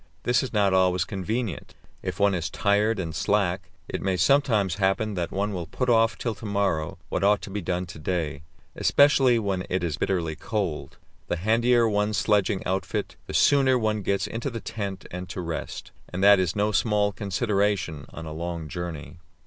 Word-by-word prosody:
This 120 Hz, -1 st, +3 dB
is 130 Hz, -, -4 dB
not 100 Hz, -3 st, +2 dB
always 90 Hz, -1 st, +3 dB
convenient; 105 Hz, -1 st, -4 dB, 0.3 s
if 95 Hz, 0 st, -5 dB
one 100 Hz, -1 st, +4 dB
is 90 Hz, 0 st, -2 dB
tired 105 Hz, +2 st, +1 dB
and 85 Hz, -4 st, -3 dB
slack, 95 Hz, +1 st, 0 dB, 0.2 s
it -, -, -4 dB
may 95 Hz, -1 st, 0 dB
sometimes 105 Hz, -4 st, +3 dB
happen 95 Hz, +3 st, +1 dB
that 90 Hz, -3 st, -2 dB
one 100 Hz, +2 st, -1 dB
will 85 Hz, -3 st, -4 dB
put 125 Hz, +8 st, -1 dB
off 115 Hz, -1 st, +3 dB
till 115 Hz, -, -2 dB
to 110 Hz, -, -11 dB
morrow 100 Hz, -6 st, 0 dB
what -, -, -1 dB
ought 105 Hz, +1 st, +4 dB
to 100 Hz, -, -7 dB
be 105 Hz, +1 st, -3 dB
done 90 Hz, +1 st, -2 dB
to 80 Hz, -, -10 dB
day, 75 Hz, -3 st, -2 dB, 0.3 s
especially 135 Hz, -4 st, +4 dB
when 100 Hz, -4 st, -1 dB
it 90 Hz, -1 st, -1 dB
is 80 Hz, -4 st, -1 dB
bitterly 85 Hz, -5 st, -1 dB
cold. 85 Hz, -3 st, -3 dB, 0.3 s
The -, -, 0 dB
handier 115 Hz, +5 st, +3 dB
one's 105 Hz, 0 st, 0 dB
sledging 105 Hz, -2 st, +1 dB
outfit, 95 Hz, +1 st, -2 dB
the -, -, -5 dB
sooner 135 Hz, -3 st, +4 dB
one 110 Hz, -2 st, 0 dB
gets 100 Hz, 0 st, 0 dB
into 115 Hz, +4 st, -3 dB
the 115 Hz, -2 st, -5 dB
tent 100 Hz, -3 st, -5 dB
and 90 Hz, 0 st, -6 dB
to 95 Hz, -, -5 dB
rest, 85 Hz, -2 st, -5 dB, 0.2 s
and 90 Hz, +2 st, -3 dB
that 100 Hz, -1 st, +7 dB
is 90 Hz, -3 st, 0 dB
no 105 Hz, +1 st, +1 dB
small 105 Hz, -1 st, +2 dB
consideration 100 Hz, -, -1 dB
on 80 Hz, -, -8 dB
a 80 Hz, -, -6 dB
long 85 Hz, 0 st, -4 dB
journey. 85 Hz, -3 st, -6 dB
100 Hz, 190 wpm, -26 LUFS, 90-110 Hz, 0.3 s, that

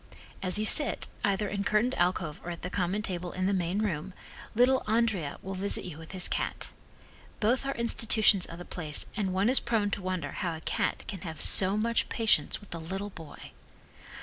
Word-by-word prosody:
As 185 Hz, +1 st, +3 dB
you 215 Hz, -, +2 dB
sit, 275 Hz, +1 st, +2 dB, 0.2 s
either 200 Hz, +1 st, +1 dB
in 200 Hz, 0 st, -2 dB
curtained 215 Hz, +5 st, +2 dB
alcove 175 Hz, -, 0 dB
or 175 Hz, -, -6 dB
at 170 Hz, -1 st, -7 dB
the 180 Hz, -, -4 dB
common 190 Hz, +3 st, -1 dB
table 180 Hz, -2 st, -4 dB
in 185 Hz, 0 st, -1 dB
the 200 Hz, -, +2 dB
main 180 Hz, 0 st, -1 dB
room, 185 Hz, -2 st, -3 dB, 0.4 s
little 255 Hz, +3 st, +4 dB
Andrea 215 Hz, -9 st, +1 dB
will 190 Hz, -, -5 dB
visit 195 Hz, +2 st, 0 dB
you 165 Hz, -4 st, -7 dB
with 160 Hz, -, -11 dB
his 185 Hz, -1 st, -1 dB
cat. -, -, -2 dB, 0.7 s
Both 250 Hz, +5 st, +1 dB
are 275 Hz, -, -2 dB
institutions 220 Hz, -4 st, +3 dB
of 165 Hz, -, -9 dB
the 175 Hz, -, -9 dB
place 155 Hz, -4 st, -4 dB
and 200 Hz, -3 st, -1 dB
one 190 Hz, +3 st, +1 dB
is, 260 Hz, +2 st, +5 dB
prone 220 Hz, -4 st, 0 dB
to 200 Hz, -, -2 dB
wonder 185 Hz, -6 st, -3 dB
how 170 Hz, -2 st, -3 dB
a 160 Hz, -, -9 dB
cat -, -, -1 dB
can 195 Hz, -5 st, -6 dB
have 160 Hz, -3 st, -7 dB
so 195 Hz, +2 st, +7 dB
much 230 Hz, +2 st, 0 dB
patience 225 Hz, -2 st, +2 dB
with 205 Hz, -, -11 dB
a 165 Hz, -, -5 dB
little 195 Hz, +5 st, -5 dB
boy. 160 Hz, -5 st, -11 dB
195 Hz, 205 wpm, -29 LUFS, 175-215 Hz, 0.7 s, so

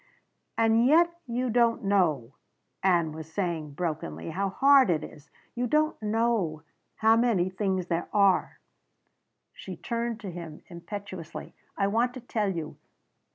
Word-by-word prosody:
"And 225 Hz, 0 st, +4 dB
yet 340 Hz, +4 st, +5 dB
you 245 Hz, +1 st, -1 dB
don't 235 Hz, -1 st, +2 dB
know," 160 Hz, -11 st, +1 dB, 0.5 s
Ann 175 Hz, -4 st, +2 dB
was 160 Hz, +1 st, -9 dB
saying 165 Hz, -5 st, -3 dB
brokenly, 140 Hz, -, -4 dB
"how 195 Hz, +1 st, -1 dB
hard 275 Hz, +4 st, +5 dB
it 160 Hz, -3 st, +1 dB
is. 145 Hz, -1 st, -12 dB, 0.2 s
You 245 Hz, +1 st, -1 dB
don't 305 Hz, +2 st, +1 dB
know 215 Hz, -8 st, 0 dB, 0.3 s
how 220 Hz, +1 st, +4 dB
many 225 Hz, -6 st, +2 dB
things 190 Hz, -1 st, -1 dB
there 170 Hz, -1 st, -2 dB
are." 200 Hz, -2 st, +2 dB, 0.9 s
She -, -, -8 dB
turned 235 Hz, -1 st, -3 dB
to 195 Hz, -4 st, -6 dB
him 165 Hz, -3 st, -9 dB
impetuously. 175 Hz, -1 st, -8 dB, 0.2 s
"I 195 Hz, -, +2 dB
want 235 Hz, +5 st, +1 dB
to -, -, -6 dB
tell 220 Hz, -4 st, -1 dB
you! 165 Hz, -5 st, -5 dB
195 Hz, 140 wpm, -27 LUFS, 170-230 Hz, 0.9 s, yet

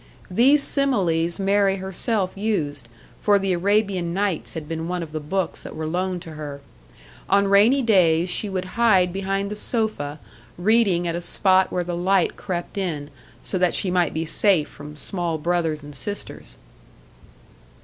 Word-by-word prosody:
These 270 Hz, +9 st, +4 dB
similes 175 Hz, -, +1 dB
Mary 195 Hz, 0 st, +2 dB
herself 190 Hz, +1 st, -2 dB
used 155 Hz, -, -2 dB, 0.3 s
for 205 Hz, -1 st, +3 dB
the 195 Hz, -1 st, 0 dB
Arabian 190 Hz, -2 st, 0 dB
Nights 195 Hz, -4 st, -2 dB
had 155 Hz, -2 st, -6 dB
been 165 Hz, 0 st, -4 dB
one 180 Hz, -1 st, -2 dB
of 155 Hz, -, -9 dB
the 155 Hz, -, -3 dB
books 170 Hz, +4 st, -3 dB
that -, -, -9 dB
were 155 Hz, 0 st, -4 dB
loaned 180 Hz, +2 st, -2 dB
to 165 Hz, -, -9 dB
her. 150 Hz, -2 st, -7 dB, 0.7 s
On 200 Hz, 0 st, +4 dB
rainy 215 Hz, +8 st, +4 dB
days 175 Hz, -6 st, +3 dB
she 200 Hz, +3 st, -1 dB
would 185 Hz, -1 st, -3 dB, 0.2 s
hide 185 Hz, -6 st, +4 dB
behind 195 Hz, +1 st, -2 dB
the -, -, -3 dB
sofa, 210 Hz, -, -1 dB, 0.4 s
reading 190 Hz, -3 st, +2 dB
at 170 Hz, -, -1 dB
a 170 Hz, -, -3 dB
spot 185 Hz, +2 st, +3 dB
where 180 Hz, -, -1 dB
the 175 Hz, 0 st, -4 dB
light 185 Hz, +1 st, +1 dB
crept 180 Hz, +1 st, -5 dB
in 150 Hz, -6 st, -3 dB, 0.3 s
so 185 Hz, -, -2 dB
that 180 Hz, -1 st, +2 dB
she 185 Hz, -, 0 dB
might 180 Hz, -1 st, +2 dB
be 160 Hz, +1 st, -3 dB
safe 170 Hz, -1 st, +2 dB
from 150 Hz, +1 st, -11 dB
small 170 Hz, +2 st, -2 dB
brothers 160 Hz, -2 st, -1 dB
and 145 Hz, 0 st, -10 dB
sisters! 205 Hz, +9 st, -5 dB
180 Hz, 165 wpm, -23 LUFS, 165-200 Hz, 0.7 s, These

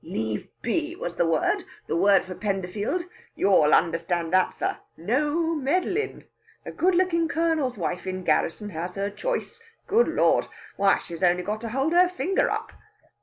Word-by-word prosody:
"Leave 110 Hz, -1 st, -3 dB, 0.2 s
be 315 Hz, +7 st, -1 dB
was 175 Hz, -, -5 dB
the 170 Hz, -, +2 dB
word 160 Hz, -2 st, +1 dB, 0.2 s
the -, -, -2 dB
word 195 Hz, +2 st, +4 dB
for 185 Hz, -, -6 dB
Penderfield. 205 Hz, -, -2 dB, 0.3 s
You'll 160 Hz, -6 st, +4 dB
understand 165 Hz, 0 st, +1 dB
that, 185 Hz, 0 st, +4 dB
sir. -, -, -3 dB, 0.2 s
No 295 Hz, -, 0 dB
meddlin'! 355 Hz, +8 st, -1 dB, 0.4 s
A -, -, -6 dB
good 365 Hz, +1 st, +2 dB
lookin' 340 Hz, -2 st, +2 dB
Colonel's 320 Hz, -6 st, 0 dB
wife 180 Hz, 0 st, -3 dB
in 185 Hz, 0 st, -4 dB
garrison 210 Hz, +3 st, 0 dB
has 175 Hz, +2 st, -5 dB
her 200 Hz, +1 st, -2 dB
choice, -, -, -4 dB, 0.2 s
good 460 Hz, +4 st, +3 dB
Lard! -, -, +2 dB, 0.3 s
Why, 200 Hz, 0 st, +4 dB
she's 170 Hz, 0 st, -9 dB
only 180 Hz, 0 st, +3 dB
got 215 Hz, +3 st, -3 dB
to 230 Hz, -, -4 dB
hold 270 Hz, +7 st, 0 dB
her 355 Hz, +1 st, +5 dB
finger 365 Hz, +1 st, 0 dB
up!" -, -, -3 dB
210 Hz, 165 wpm, -25 LUFS, -, 0.4 s, her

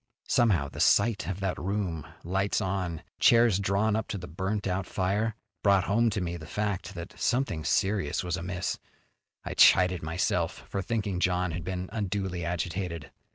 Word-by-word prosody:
Somehow, 100 Hz, -, +3 dB
the -, -, -10 dB
sight 110 Hz, -2 st, +3 dB
of 95 Hz, 0 st, -4 dB
that 95 Hz, -2 st, -1 dB
room, 90 Hz, -6 st, -2 dB, 0.2 s
lights 95 Hz, +3 st, 0 dB
on, 95 Hz, -5 st, -2 dB, 0.2 s
chairs 115 Hz, -4 st, +5 dB
drawn 100 Hz, +2 st, +1 dB
up 110 Hz, -1 st, -1 dB
to -, -, -3 dB
the 90 Hz, -, -7 dB
burnt 95 Hz, +5 st, -3 dB
out 95 Hz, -1 st, -1 dB
fire, 105 Hz, +4 st, 0 dB, 0.3 s
brought 100 Hz, -2 st, +4 dB
home 115 Hz, +4 st, +2 dB
to 105 Hz, -, -2 dB
me 85 Hz, -1 st, -3 dB
the 75 Hz, -2 st, -10 dB
fact 100 Hz, -2 st, -3 dB
that -, -, -7 dB
something 120 Hz, -, 0 dB
serious 100 Hz, +3 st, +1 dB
was 90 Hz, -1 st, -1 dB
amiss. 90 Hz, +1 st, -3 dB, 0.7 s
I -, -, -3 dB
chided 90 Hz, -1 st, +6 dB
myself 80 Hz, +3 st, -1 dB
for 100 Hz, -, -2 dB
thinking 100 Hz, -2 st, -2 dB
John 90 Hz, -1 st, +1 dB
had 85 Hz, +1 st, -4 dB
been 90 Hz, +1 st, -4 dB
unduly 95 Hz, -4 st, -2 dB
agitated. 85 Hz, -1 st, -3 dB
95 Hz, 165 wpm, -28 LUFS, 90-105 Hz, 0.7 s, chided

